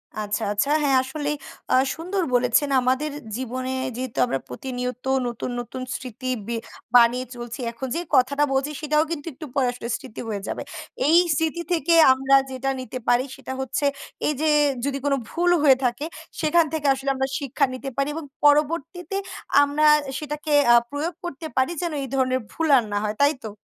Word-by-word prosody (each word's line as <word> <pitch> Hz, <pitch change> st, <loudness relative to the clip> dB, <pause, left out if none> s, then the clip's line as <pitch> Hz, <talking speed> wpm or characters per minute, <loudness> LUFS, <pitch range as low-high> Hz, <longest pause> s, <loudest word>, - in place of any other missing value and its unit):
আচ্ছা, 210 Hz, -1 st, -2 dB
আচ্ছা, 210 Hz, +7 st, 0 dB
হ্যাঁ, 280 Hz, -2 st, +3 dB
আ -, -, +3 dB
আসলেই 290 Hz, +2 st, -3 dB, 0.6 s
সুন্দর 365 Hz, +4 st, -2 dB
বলেছেন, 250 Hz, +3 st, +3 dB
আমাদের 260 Hz, +4 st, 0 dB, 0.3 s
জীবনে 255 Hz, +1 st, -4 dB, 0.2 s
যেহেতু 255 Hz, -1 st, -5 dB
আমরা 135 Hz, -, -2 dB
প্রতিনিয়ত 250 Hz, -, -5 dB, 0.2 s
নতুন, 240 Hz, +1 st, -4 dB
নতুন 245 Hz, +2 st, -6 dB
স্মৃতি 255 Hz, 0 st, -7 dB, 0.2 s
বে 235 Hz, -, -2 dB, 0.4 s
বানিয়ে 245 Hz, +1 st, +5 dB
চলছি, 240 Hz, 0 st, -7 dB
এখন 235 Hz, +3 st, -6 dB
যে, -, -, 0 dB, 0.2 s
কথাটা 280 Hz, +3 st, +3 dB
বলছি, 270 Hz, +3 st, 0 dB
সেটাও 300 Hz, 0 st, +2 dB
কিন্তু 315 Hz, 0 st, -4 dB
একটু 310 Hz, -, -9 dB
পরে 265 Hz, -3 st, +2 dB
আসলে 245 Hz, -1 st, -7 dB
স্মৃতি -, -, -9 dB
হয়ে 205 Hz, -2 st, -3 dB
যাবে। -, -, -3 dB, 0.5 s
এই 325 Hz, +3 st, +6 dB, 0.2 s
স্মৃতি 325 Hz, +2 st, -1 dB
থেকে 335 Hz, 0 st, +2 dB, 0.2 s
আমরা 270 Hz, +1 st, +3 dB, 0.2 s
যেটা 260 Hz, +1 st, -2 dB
নিতে 255 Hz, 0 st, -6 dB
পারি, 245 Hz, +1 st, +4 dB
সেটা 260 Hz, -, -7 dB
হচ্ছে 265 Hz, +3 st, -2 dB, 0.4 s
এই 300 Hz, -, +2 dB
যে, 315 Hz, -, +2 dB, 0.4 s
যদি 275 Hz, -1 st, -1 dB
কোন 285 Hz, -, +2 dB, 0.2 s
ভুল 350 Hz, +1 st, +1 dB
হয়ে 270 Hz, -3 st, +6 dB
থাকে, 245 Hz, +4 st, -1 dB, 0.4 s
সেখান 320 Hz, +1 st, +4 dB
থেকে 305 Hz, -2 st, -1 dB
আসলে 270 Hz, +1 st, -3 dB
আমরা 265 Hz, 0 st, 0 dB
শিক্ষা 280 Hz, 0 st, +1 dB
নিতে 265 Hz, +2 st, -5 dB
পারি 275 Hz, -, +1 dB
এবং 325 Hz, -1 st, -5 dB, 0.2 s
পরবর্তীতে 315 Hz, +5 st, +2 dB, 0.5 s
আমরা 285 Hz, +2 st, +2 dB, 0.3 s
সেটাকে 300 Hz, 0 st, -5 dB, 0.2 s
আ -, -, +8 dB
প্রয়োগ 305 Hz, +5 st, -3 dB
করতে 325 Hz, -2 st, -6 dB
পারি, 260 Hz, +4 st, +2 dB
যেন 345 Hz, -, -2 dB
এই -, -, -5 dB
ধরনের 255 Hz, -1 st, +2 dB
ভুল 325 Hz, -, -1 dB
আর 245 Hz, -, +2 dB
না 205 Hz, -, 0 dB
হয়, 210 Hz, 0 st, -2 dB
তাই 285 Hz, +2 st, +5 dB
তো? 220 Hz, -, -4 dB
270 Hz, 180 wpm, -24 LUFS, 250-300 Hz, 0.6 s, আ